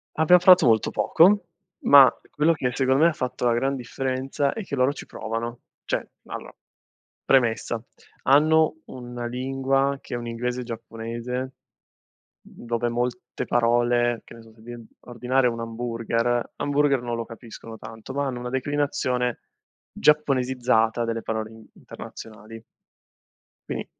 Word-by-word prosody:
Abbiamo 160 +3 +5
parlato 185 -2 +7
molto 110 -3 +3
poco, 195 +3 +4 0.4
ma 140 -2 +8 0.2
quello 150 +3 +2
che 130 -5 -1
secondo 130 +3 +2
me 170 - +7
ha - - -3
fatto 125 -3 -3
la 120 - +3
gran 135 +4 0
differenza 130 +2 -2
è 225 - -5
che 160 - -5
loro 130 +1 +2
ci 145 - -9
provano. 115 +2 -5 0.3
Cioè, - - -2 0.2
allora, - - -8 0.7
premessa, 120 -3 +1 0.4
hanno 155 +3 +4
una 120 -1 -7
lingua 135 +2 0
che - - -6
è - - -2
un 120 0 -6
inglese 125 +2 -3
giapponese, 120 +2 -5 0.9
dove 120 0 -4
molte 120 +1 -3
parole 120 0 +2
che - - -14
ne 115 - -13
so, 110 0 -18
se 110 - -21
devi 120 0 -10
ordinare 125 +1 0
un 115 -1 -2
hamburger 115 +1 -2
hamburger 145 -2 +1
non 120 -1 -3
lo 115 - -4
capiscono 115 0 -11
tanto, 115 +4 -10
ma 140 +1 -1
hanno 125 -2 -4
una 125 0 -5
declinazione 130 -2 -1 0.5
giapponesizzata 125 -6 +2
delle 115 0 -2
parole 110 -1 -3
in 110 -1 -14
internazionali. 110 0 -11 1.1
Quindi - - -4
125 Hz, 140 wpm, -24 LUFS, 115-135 Hz, 1.1 s, ma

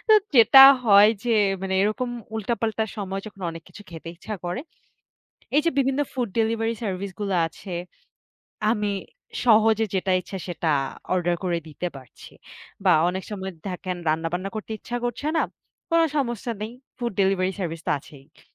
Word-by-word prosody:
তো - - +7 0.2
যেটা 240 +4 +9 0.2
হয় 205 0 +7
যে 235 - +1 0.3
মানে 190 0 -1
এরকম 215 +4 0 0.3
উল্টাপাল্টা 220 0 -1
সময় 195 -1 -3
যখন 195 -2 -11
অনেক 165 0 -9
কিছু 205 - -13
খেতে 165 0 -9
ইচ্ছা 215 +4 -6
করে, 175 +7 -2 1.0
এইযে 330 +3 +3
বিভিন্ন 270 +1 +2
ফুড 245 -4 -2
ডেলিভারি 225 +1 +1
সার্ভিসগুলো 195 0 -3
আছে। 180 +3 -10 1.0
আমি 210 -2 -1 0.5
সহজে 220 -1 +5
যেটা 190 0 +1
ইচ্ছা 190 +2 -7
সেটা 170 -2 -1 0.4
অর্ডার 175 -1 +1
করে 175 -2 0
দিতে 175 +4 -4
পারছি। 130 -2 -13 0.5
বা, 185 - +6 0.2
অনেক 190 +1 -3
সময় 190 -2 -5 0.2
থাকেন 180 0 -4
রান্নাবান্না 165 +4 -1
করতে 215 +1 -5
ইচ্ছা 245 - -5
করছে 245 +5 -3
না। - - +3 0.5
কোন 335 - +4 0.2
সমস্যা 240 -2 -2
নেই। 220 - -5 0.3
ফুড 240 -3 -2
ডেলিভারি 190 -1 +2
সার্ভিস 165 -2 -3
তো - - +2
আছেই। 140 +2 -17
200 Hz, 150 wpm, -24 LUFS, 180-225 Hz, 1.0 s, যেটা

